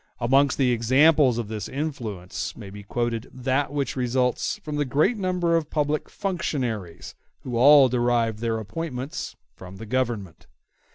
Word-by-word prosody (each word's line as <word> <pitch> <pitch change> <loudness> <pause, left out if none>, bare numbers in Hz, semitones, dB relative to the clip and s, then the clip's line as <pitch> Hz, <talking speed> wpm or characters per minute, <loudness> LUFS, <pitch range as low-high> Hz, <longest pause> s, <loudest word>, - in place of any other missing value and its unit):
Amongst 135 +3 +3
the 130 -3 +3
examples 130 +3 +4
of 120 -3 -3
this 105 -2 -5
influence 120 - -5
may 100 -4 -9
be 105 +1 -9
quoted 115 +3 -3
that 130 +2 -1
which 145 -2 -2
results 125 -1 0
from 150 -1 -4
the 145 - +2
great 145 - +2
number 180 -4 0
of 160 -2 -1
public 150 0 -1
functionaries, 120 - -3 0.3
who 125 -2 -5
all 140 +3 +7
derive 120 -3 +1
their 115 -1 -1
appointments 130 +4 -5 0.2
from 95 +1 -11
the 115 - -8
Government. 115 -7 -3
125 Hz, 150 wpm, -24 LUFS, 115-145 Hz, 0.3 s, all